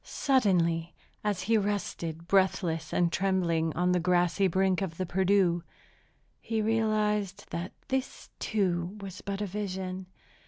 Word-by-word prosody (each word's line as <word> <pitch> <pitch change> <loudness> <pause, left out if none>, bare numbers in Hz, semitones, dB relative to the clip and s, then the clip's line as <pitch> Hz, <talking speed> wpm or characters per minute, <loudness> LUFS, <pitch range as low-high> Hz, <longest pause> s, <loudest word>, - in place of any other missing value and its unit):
Suddenly, 175 - +1 0.3
as 205 -3 0
he 220 +2 +3
rested, 170 -5 -3
breathless 175 -5 +1
and 175 -1 +2
trembling, 175 -4 +1
on 180 +1 +2
the 180 - +3
grassy 180 +2 +2
brink 190 +1 +2
of 170 -4 -3
the 185 - -1
Perdu, 185 -1 +2 0.8
he 225 -1 -2
realized 215 -3 +1
that 170 +2 -4 0.2
this, 265 -1 -3
too, 185 -2 0
was 195 -2 -8
but 200 0 -4
a - - 0
vision. 190 -2 -4
190 Hz, 130 wpm, -29 LUFS, 175-205 Hz, 0.8 s, he